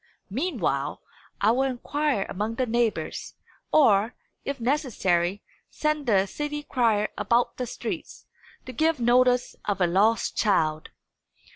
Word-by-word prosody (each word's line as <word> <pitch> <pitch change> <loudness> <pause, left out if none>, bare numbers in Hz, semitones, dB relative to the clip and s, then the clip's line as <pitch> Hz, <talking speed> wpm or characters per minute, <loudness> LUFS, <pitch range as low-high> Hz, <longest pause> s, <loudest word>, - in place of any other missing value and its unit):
Meanwhile, 195 - -2 0.4
I 210 - +5
will 250 +3 +1
inquire 270 -2 -1
among 210 +4 -3
the 255 - 0
neighbours; 235 -1 -1 0.4
or, 225 -5 +4 0.3
if 280 -1 -4
necessary, 205 - 0 0.3
send 305 -2 -1
the 195 -4 +4
city 295 +7 -4
crier 225 -6 +1
about 235 +1 +1
the 250 - -3
streets, - - -6 0.4
to 255 - -8
give 315 +3 +1
notice 245 +1 +3
of 200 -2 -1
a 180 - +4
lost 205 +6 +2
child." 155 -7 +1
235 Hz, 125 wpm, -26 LUFS, 200-270 Hz, 0.4 s, I